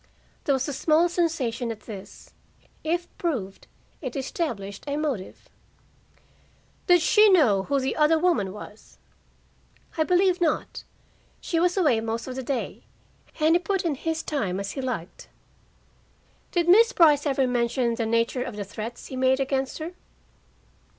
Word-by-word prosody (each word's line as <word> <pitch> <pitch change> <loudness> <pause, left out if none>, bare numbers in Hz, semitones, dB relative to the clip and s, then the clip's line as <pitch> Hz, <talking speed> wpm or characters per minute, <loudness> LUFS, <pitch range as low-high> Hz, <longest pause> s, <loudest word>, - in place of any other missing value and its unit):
There 280 - +3
was 265 +1 -1
a 290 - -3
small 315 +5 +3
sensation 270 -9 -1
at 215 -1 -8
this. 200 -4 -11 0.5
If 345 +2 -1
proved, 230 - -3 0.3
it 255 -5 -5
established 235 - -4
a 285 0 -1
motive. 280 -11 -4 1.4
"Did 355 -1 +6
she 425 +5 +6
know 265 - +4
who 280 -1 +1
the 265 0 -2
other 310 +1 +4
woman 315 - +1
was?" 210 +1 -12 1.0
"I - - +5
believe 360 +1 +2
not. 320 -3 -1 0.5
She 330 - -1
was 355 +2 +1
away 285 -12 +3
most 225 +2 -3
of 255 - -5
the 265 - -3
day, 260 -1 -3 0.6
and 310 +1 +4
he 345 - +4
put 370 +1 -2
in 325 - +1
his 320 +3 -3
time 200 -11 -2
as 200 0 -4
he 270 - -5
liked." 240 -10 -5 1.2
"Did 345 -1 0
Miss 455 +7 +6
Brice 300 -3 +5
ever 270 -1 +2
mention 240 -1 0
the 230 -1 -2
nature 230 +2 +1
of 250 -3 -5
the 205 -1 -5
threats 220 +4 -7
he 265 - -7
made 260 +1 +2
against 270 0 -1
her?" 320 +2 -5
270 Hz, 155 wpm, -25 LUFS, 230-330 Hz, 1.4 s, Did